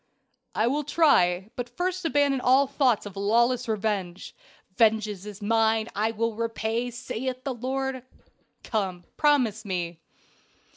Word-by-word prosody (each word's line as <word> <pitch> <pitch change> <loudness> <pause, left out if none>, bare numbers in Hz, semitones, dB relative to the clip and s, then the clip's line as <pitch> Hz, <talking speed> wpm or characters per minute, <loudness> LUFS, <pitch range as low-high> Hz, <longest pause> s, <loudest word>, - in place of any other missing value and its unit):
"I 220 - +2
will 285 +5 0
try. 215 - +3
But 245 -1 -4
first 360 +7 -3
abandon 285 -4 +2
all 260 +3 +5
thoughts 265 -6 +1
of 205 - -8
lawless 235 +5 +2
revenge. 200 -4 -2 0.4
'Vengeance 215 -3 +2
is 205 0 -9
mine, 225 +1 +2
I 215 +2 0
will 230 +1 -1
repay, 230 +1 -2
saith 255 +1 -5
the 275 - -2
Lord.' 260 +1 -3 0.6
Come, 190 -5 -2
promise 255 -8 +2
me." 175 -4 -3
230 Hz, 130 wpm, -26 LUFS, 210-260 Hz, 0.6 s, all